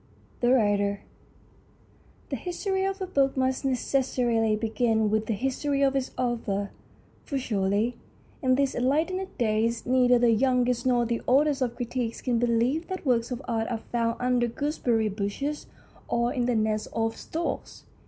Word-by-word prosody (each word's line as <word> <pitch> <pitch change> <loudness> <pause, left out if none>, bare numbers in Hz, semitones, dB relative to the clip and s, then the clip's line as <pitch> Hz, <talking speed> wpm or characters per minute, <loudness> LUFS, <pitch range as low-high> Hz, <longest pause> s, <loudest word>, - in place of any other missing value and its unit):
THE 240 0 +3
WRITER 205 -4 +2 1.3
THE - - 0
history 380 +2 -2
of 390 0 -2
a - - -1
book 275 -7 +1
must 260 +1 0
necessarily 250 -4 +1
begin 220 -1 +1
with 215 0 0
the 225 - 0
history 275 +4 0
of 275 0 +2
its 265 -1 0
author, 225 -5 -1 0.5
for 280 - -3
surely 210 -1 0 0.4
in 255 -2 +3
these 275 0 +1
enlightened 320 +10 0
days 230 -1 0
neither 250 -1 +4
the 240 -1 +4
youngest 250 +1 +2
nor 240 -1 +3
the 235 0 -1
oldest 280 +2 +3
of 240 -2 0
critics 240 -1 -3
can 245 -3 0
believe 245 +7 +1
that 375 -3 -5
works 235 -3 +2
of 250 +1 -5
art 225 -2 -1
are 235 - -1
found 230 -1 0
under 250 -1 +2
gooseberry 240 -4 0
bushes 210 +9 -3 0.4
or 235 0 0
in 245 -2 0
the 245 - +1
nests 215 -1 0
of 225 0 0
storks. 335 +2 -5
245 Hz, 155 wpm, -27 LUFS, 225-270 Hz, 1.3 s, neither